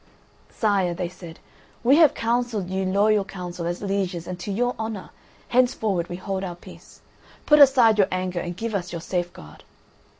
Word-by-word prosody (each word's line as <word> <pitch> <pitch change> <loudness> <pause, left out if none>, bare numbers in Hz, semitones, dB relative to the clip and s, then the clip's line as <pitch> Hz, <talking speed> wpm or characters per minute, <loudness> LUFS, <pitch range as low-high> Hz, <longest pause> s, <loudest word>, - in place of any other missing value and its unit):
"Sire," 195 -5 0
they 175 0 -3
said, 170 -2 -11 0.5
"we 265 +5 +5
have 320 -4 +6
counselled 230 -5 -1
you 190 0 -1
loyal 205 +2 +3
counsel 180 -3 -6
as 175 +3 -4
lieges 195 -4 -2
and 180 0 -6
to 190 +3 -5
your 245 +5 0
honour; 220 -3 -5 0.4
henceforward 220 -8 +1
we 175 - -4
hold 190 +1 -4
our 180 -2 -5
peace. 175 - -15 0.4
Put 300 0 +5
aside 250 -6 +6
your 195 - +5
anger 185 -1 -2
and 175 0 -5
give 225 +1 -4
us 180 -3 -3
your 170 -1 -5
safe 175 0 -2
guard." 75 0 -14
195 Hz, 175 wpm, -24 LUFS, 175-220 Hz, 0.5 s, have